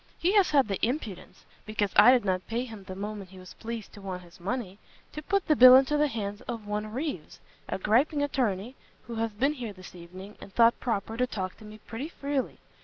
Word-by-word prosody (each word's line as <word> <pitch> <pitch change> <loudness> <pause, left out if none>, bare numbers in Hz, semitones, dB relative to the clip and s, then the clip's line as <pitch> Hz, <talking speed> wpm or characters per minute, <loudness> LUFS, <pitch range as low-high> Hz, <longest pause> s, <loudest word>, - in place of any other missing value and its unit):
He 355 - +1
has 405 -3 +5
had 275 -5 +4
the 195 -2 -4
impudence, 230 - -3 0.2
because 215 -2 -1
I 210 +4 +9
did 250 -4 +3
not 185 -2 -1
pay 235 +2 -2
him 220 -5 -10
the 185 - -7
moment 200 -1 -6
he 190 - -14
was 185 0 -12
pleased 230 -2 -7
to 205 - -12
want 185 -2 -6
his 175 +1 -17
money, 200 0 -4 0.3
to 300 - -6
put 390 +5 0
the 305 - +4
bill 255 -1 +10
into 270 +3 +4
the 295 0 +3
hands 205 -5 -4
of 225 -3 -5
one 210 +1 -3
Reeves, 255 - -5 0.3
a - - -1
griping 265 +9 +2
attorney, 245 -4 -1 0.3
who 230 0 -6
has 225 0 -1
been 270 +8 +1
here 240 -7 -6
this 185 -1 -13
evening, 185 +4 -11
and - - -11
thought 230 0 +5
proper 225 -2 -2
to 250 +1 +1
talk 185 -6 -4
to 215 - -14
me 210 0 -11
pretty 230 +7 -7
freely. 280 -5 -3
220 Hz, 225 wpm, -28 LUFS, 195-260 Hz, 0.3 s, bill